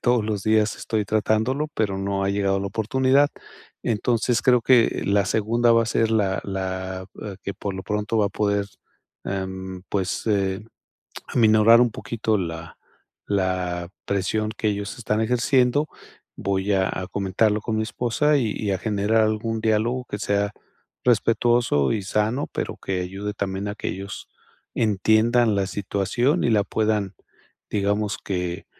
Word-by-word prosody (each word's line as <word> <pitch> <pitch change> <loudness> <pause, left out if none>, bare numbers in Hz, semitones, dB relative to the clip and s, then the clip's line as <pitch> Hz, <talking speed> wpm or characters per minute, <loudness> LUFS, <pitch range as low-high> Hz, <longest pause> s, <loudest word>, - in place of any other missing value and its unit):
todos 120 -3 +2
los 105 -3 -2
días 110 -1 +2
estoy 110 -2 -2
tratándolo, 110 +7 +1
pero 100 -3 -1
no 100 0 -1
ha 100 - +1
llegado 100 -1 +1
la 100 - -2
oportunidad. 130 +7 +2 0.5
Entonces, 115 +1 +1
creo 125 -2 +4
que 125 -3 +4
la 100 0 +2
segunda 115 +4 +2
va 115 0 +5
a - - -3
ser 115 -1 +1
la 100 -3 +1
la, 95 -1 -4 0.2
eh, 100 -3 -6
que 100 - -4
por 100 -2 -4
lo 95 - -5
pronto 105 +1 -2
va 105 - +3
a - - -1
poder, 100 -1 0 0.6
em, 95 -1 -5
pues, 95 -2 -2
eh, 100 -1 0 0.7
aminorar 110 0 +5
un 120 -2 +3
poquito 110 0 -1
la 80 -2 -6 0.5
la 90 -3 -1 0.2
presión 100 +2 -1
que 110 - -1
ellos 100 +1 -4
están 110 -2 -1
ejerciendo. 125 +4 +2 0.5
Voy 100 +1 -1
a 95 -1 +2
a 90 0 -4
comentarlo 100 +2 +1
con 110 - -2
mi 110 - +1
esposa 125 +6 +1
y 115 -5 0
y 105 -2 -1
a 95 - -1
generar 110 +1 +1
algún 110 +1 -1
diálogo 115 +3 +1
que 105 - -3
sea 100 -1 0 0.5
respetuoso 115 - +3
y 105 - -1
sano, 110 +7 0
pero - - -3
que 95 -1 -3
ayude 95 +3 -4
también 100 0 -3
a 105 - -4
que - - -4
ellos 100 +2 -6 0.5
entiendan 110 +2 +3
la 95 -1 0
situación 105 - 0
y 120 - +2
la 105 -2 +3
puedan, 105 -2 0 0.6
digamos 105 +1 0
que 90 -2 -4
105 Hz, 155 wpm, -23 LUFS, 95-115 Hz, 0.7 s, va